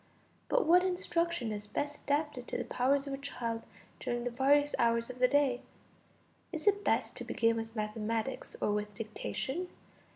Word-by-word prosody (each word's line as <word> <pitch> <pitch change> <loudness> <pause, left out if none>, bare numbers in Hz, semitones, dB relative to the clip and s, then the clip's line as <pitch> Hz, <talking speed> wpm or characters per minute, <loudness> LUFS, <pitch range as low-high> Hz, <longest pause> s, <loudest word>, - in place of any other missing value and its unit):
But - - +3
what 355 +3 +6
instruction 340 - 0
is 205 0 -5
best 290 +7 -3
adapted 290 -3 0
to - - -2
the - - -1
powers 275 +3 +2
of 280 - -4
a 270 - -4
child 235 -5 -3 0.4
during 240 0 -2
the 245 - -2
various 285 +4 +4
hours 230 +1 +2
of 250 - -12
the 250 - +6
day? 275 -3 +3 0.9
Is 320 0 -5
it 405 0 +4
best - - +1
to - - -4
begin 230 0 +2
with 225 0 -4
mathematics 220 +3 -2
or - - +1
with 210 0 -2
dictation? 260 - -3
255 Hz, 170 wpm, -32 LUFS, 230-290 Hz, 0.9 s, what